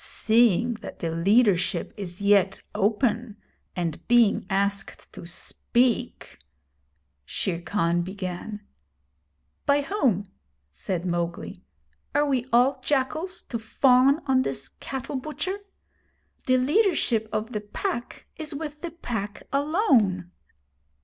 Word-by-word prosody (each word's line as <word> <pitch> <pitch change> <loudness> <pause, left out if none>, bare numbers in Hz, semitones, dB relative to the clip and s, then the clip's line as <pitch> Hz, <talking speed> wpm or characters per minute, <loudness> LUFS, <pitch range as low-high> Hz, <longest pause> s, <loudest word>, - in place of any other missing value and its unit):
'Seeing 235 +1 +3
that - - -8
the 165 - -3
leadership 195 +2 +2
is 185 -2 -6
yet 200 -1 +4
open, 215 +1 0 0.4
and 170 -3 -3
being 240 -3 +4
asked 200 0 -2
to 170 - -9
speak 235 +6 -1 0.4
' 70 +1 -46 0.2
Shere 170 - -3
Khan 175 -2 +1
began. 190 +3 -5 1.1
'By 285 0 +4
whom?' 235 - 0 0.4
said 175 - -3
Mowgli. 170 -1 -3 0.5
'Are 295 +1 +4
we 260 -3 0
all 255 +3 +4
jackals, 310 +7 -1
to 230 - -4
fawn 260 +6 +4
on 265 -2 +3
this - - -3
cattle 265 +1 -5
butcher? 310 +8 -4 0.9
The 255 0 +5
leadership 265 - +2
of 220 +3 -2
the 210 - -3
Pack 240 - -4
is 310 -2 -4
with 300 0 -6
the 345 - -4
Pack 225 - -5
alone.' 270 - +2
225 Hz, 115 wpm, -26 LUFS, 190-275 Hz, 1.1 s, The